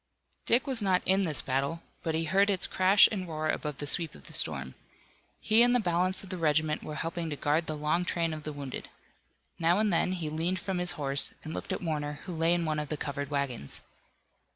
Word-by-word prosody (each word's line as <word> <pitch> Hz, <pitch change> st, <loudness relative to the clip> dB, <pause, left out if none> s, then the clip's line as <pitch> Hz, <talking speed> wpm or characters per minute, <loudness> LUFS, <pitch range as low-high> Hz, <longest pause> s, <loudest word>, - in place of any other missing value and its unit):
Dick 245 Hz, +4 st, +3 dB
was 260 Hz, -5 st, +1 dB
not 190 Hz, -3 st, +1 dB
in 190 Hz, +1 st, +3 dB
this 155 Hz, -9 st, +3 dB
battle, 140 Hz, +5 st, -2 dB, 0.2 s
but 160 Hz, -1 st, -2 dB
he 165 Hz, -, 0 dB
heard 195 Hz, +6 st, +2 dB
it's 190 Hz, -2 st, +2 dB
crash 190 Hz, +2 st, +5 dB
and 190 Hz, -4 st, -4 dB
roar 155 Hz, -1 st, -3 dB
above 150 Hz, -3 st, -3 dB
the 145 Hz, -, -4 dB
sweep 165 Hz, +1 st, 0 dB
of -, -, -15 dB
the -, -, -13 dB
storm. -, -, +1 dB, 0.7 s
He 220 Hz, +2 st, +4 dB
and 245 Hz, +1 st, +5 dB
the -, -, +4 dB
balance 185 Hz, -1 st, 0 dB
of 190 Hz, -, -12 dB
the 185 Hz, -, -4 dB
regiment 155 Hz, -1 st, +1 dB
were 150 Hz, -, -7 dB
helping 165 Hz, +1 st, -4 dB
to 150 Hz, -, -3 dB
guard 150 Hz, +3 st, 0 dB
the 155 Hz, -, -3 dB
long 150 Hz, +4 st, 0 dB
train 170 Hz, -2 st, -1 dB
of 155 Hz, -, -6 dB
the 150 Hz, -, -5 dB
wounded. 140 Hz, -3 st, -7 dB, 0.7 s
Now 170 Hz, +2 st, +3 dB
and 210 Hz, -2 st, +1 dB
then, 180 Hz, +2 st, +1 dB
he 170 Hz, -4 st, -4 dB
leaned 165 Hz, +4 st, -1 dB
from 190 Hz, -2 st, -3 dB
his 180 Hz, 0 st, +4 dB
horse 140 Hz, -1 st, +3 dB
and 155 Hz, -, -6 dB
looked -, -, -6 dB
at -, -, -3 dB
Warner 150 Hz, -3 st, -2 dB
who 185 Hz, -, -6 dB
lay 165 Hz, +1 st, +2 dB
in 170 Hz, -1 st, -1 dB
one 155 Hz, -1 st, -1 dB
of 150 Hz, -1 st, -5 dB
the 155 Hz, -, 0 dB
covered 140 Hz, -1 st, -4 dB
wagons. 140 Hz, -, 0 dB
165 Hz, 230 wpm, -29 LUFS, 150-185 Hz, 0.7 s, crash